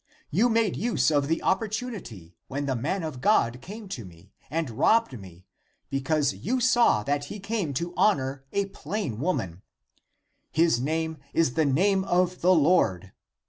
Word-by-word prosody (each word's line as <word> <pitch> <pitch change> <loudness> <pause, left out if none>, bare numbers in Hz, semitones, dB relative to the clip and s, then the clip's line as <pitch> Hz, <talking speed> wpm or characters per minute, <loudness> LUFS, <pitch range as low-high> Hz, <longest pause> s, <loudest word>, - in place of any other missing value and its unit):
You 220 +10 +3
made 225 -3 +2
use 160 - +1
of 145 -2 +2
the 165 +2 -1
oppor 210 +3 +1
tunity 200 - -6
(when) 140 +2 -3
the 135 -2 -1
man 165 +10 -2
of 145 -6 -5
God 125 - +2
(came 210 - -9
to 125 -11 -5
me), 90 +1 -15 0.2
and 160 -4 -2
robbed 140 - +2
me, 95 -2 -14 0.5
because 145 +2 +1
you 255 +6 -2
saw 240 - +4
that 145 +3 -1
he 205 +8 -7
came 200 -5 -2
to 170 +6 -3
honor 135 -9 +1
a 200 0 0
plain 195 - -4
woman; 95 - -2 0.9
his 160 -6 +3
name 160 +3 -2 0.2
is 165 -7 +2
the 160 +2 +2
name 190 +8 +2
of 180 0 +1
the 180 - +4
Lord. 125 - +2
160 Hz, 165 wpm, -26 LUFS, 130-195 Hz, 0.9 s, saw